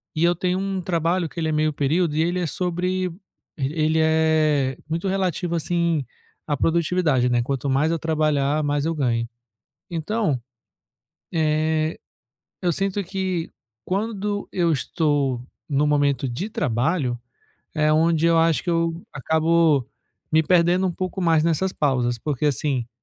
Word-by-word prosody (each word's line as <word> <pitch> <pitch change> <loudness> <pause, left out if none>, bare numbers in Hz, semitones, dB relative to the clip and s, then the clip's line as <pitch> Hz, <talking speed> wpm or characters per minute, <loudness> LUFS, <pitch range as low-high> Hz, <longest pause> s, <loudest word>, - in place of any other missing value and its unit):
e 160 - 0
eu 175 0 +4
tenho 190 +2 -1
trabalho 170 0 0
que 170 - -8
ele 160 -1 0
é - - 0
meio 155 0 +1
período 150 +3 +1
e 160 - +2
ele 175 +2 0
é 175 - -1
sobre 180 +2 -1 0.5
ele 155 +3 0
é 155 -4 +2
muito 170 +4 -2
relativo 180 -2 -1
assim 170 -3 0 0.4
a 145 - +1
produtividade, 165 -6 +2
né. 120 -1 +2
Quanto 135 +1 -2
mais 145 +5 +2
eu 165 - +1
trabalhar 155 -2 +1
mais 145 0 0
eu 165 - 0
ganho 115 -5 0 0.7
então, 165 - -1 0.9
eh, 155 0 +1 0.6
eu, 175 - +2
sinto 195 +3 -1
que 185 -2 -2 0.4
quando 205 +1 -2
eu 170 -2 +2
estou 145 -4 0 0.3
no 145 +1 +2
momento 145 -2 +1
de 155 - -4
trabalho, 130 - 0 0.6
é 155 -1 +2
onde 165 +1 +3
eu 165 -1 +4
acho 165 -1 +3
que 175 - -1
eu 165 0 0
acabo 160 -1 +2 0.5
me 160 - +5
perdendo 180 +2 +3
um 180 - -1
pouco 185 +2 -4
mais 165 -2 +3
nessas 170 +3 +1
pausas 125 -4 0
porque 150 +3 -3
assim 135 -3 -1
160 Hz, 145 wpm, -23 LUFS, 145-175 Hz, 0.9 s, me